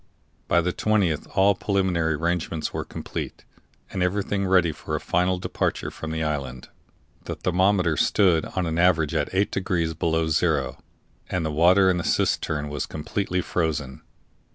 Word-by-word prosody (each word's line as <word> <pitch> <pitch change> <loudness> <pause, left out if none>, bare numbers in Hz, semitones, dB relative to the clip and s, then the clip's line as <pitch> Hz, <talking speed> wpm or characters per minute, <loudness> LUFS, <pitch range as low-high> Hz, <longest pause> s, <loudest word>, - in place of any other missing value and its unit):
By 85 - +3
the 90 +1 -1
20th 100 -8 +1
all 100 +1 +5
preliminary 90 -5 0
arrangements 85 0 -2
were - - -2
complete, - - -6 0.5
and 95 - -3
everything 100 +1 0
ready 90 -3 +4
for - - -5
a - - -1
final 90 +2 +1
departure 90 - -2
from 80 - -7
the 80 0 -2
island. 70 -5 -4 0.6
The - - -4
thermometer 90 -2 +2
stood 90 -3 +3
on 95 -1 -2
an 80 0 -1
average 85 -4 +3
at 75 -3 0
8 95 +2 +1
degrees 85 -4 -1
below 80 0 0
zero, 80 - 0 0.5
and 90 -3 -1
the 80 - -1
water 90 +5 +5
in 90 -1 +3
the 85 - -2
cistern 75 -2 0
was 75 0 -3
completely 90 +4 -2
frozen. 75 -7 -2
85 Hz, 155 wpm, -24 LUFS, 80-95 Hz, 0.6 s, all